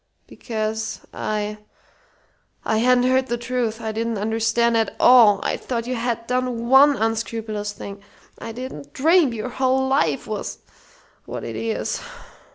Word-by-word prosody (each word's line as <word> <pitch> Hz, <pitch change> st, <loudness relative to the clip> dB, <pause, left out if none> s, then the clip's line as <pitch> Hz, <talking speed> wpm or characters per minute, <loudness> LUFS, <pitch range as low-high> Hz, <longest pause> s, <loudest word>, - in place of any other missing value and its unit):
Because 220 Hz, -1 st, -4 dB
I 210 Hz, 0 st, -3 dB, 1.1 s
I 220 Hz, -, +1 dB
hadn't 250 Hz, +1 st, +4 dB
heard 260 Hz, +1 st, +2 dB
the 240 Hz, -, -1 dB
truth. 235 Hz, -2 st, -2 dB
I 220 Hz, -1 st, -3 dB
didn't 225 Hz, 0 st, -2 dB
understand 225 Hz, +2 st, +1 dB
at 225 Hz, -2 st, 0 dB
all. 225 Hz, -6 st, +7 dB
I -, -, -1 dB
thought 235 Hz, -2 st, -4 dB
you 255 Hz, -, -2 dB
had 235 Hz, -1 st, -2 dB
done 250 Hz, -1 st, -2 dB
one 280 Hz, +2 st, +7 dB
unscrupulous 220 Hz, -1 st, -2 dB
thing. 200 Hz, 0 st, -9 dB, 0.4 s
I 225 Hz, -, -6 dB
didn't 260 Hz, +4 st, -8 dB
dream 315 Hz, 0 st, +4 dB
your 230 Hz, +1 st, -4 dB
whole 265 Hz, +1 st, +1 dB
life 165 Hz, -, +1 dB
was 215 Hz, -1 st, -5 dB, 0.7 s
what -, -, -6 dB
it -, -, -5 dB
is. 225 Hz, -1 st, -2 dB
230 Hz, 145 wpm, -22 LUFS, 220-255 Hz, 1.1 s, all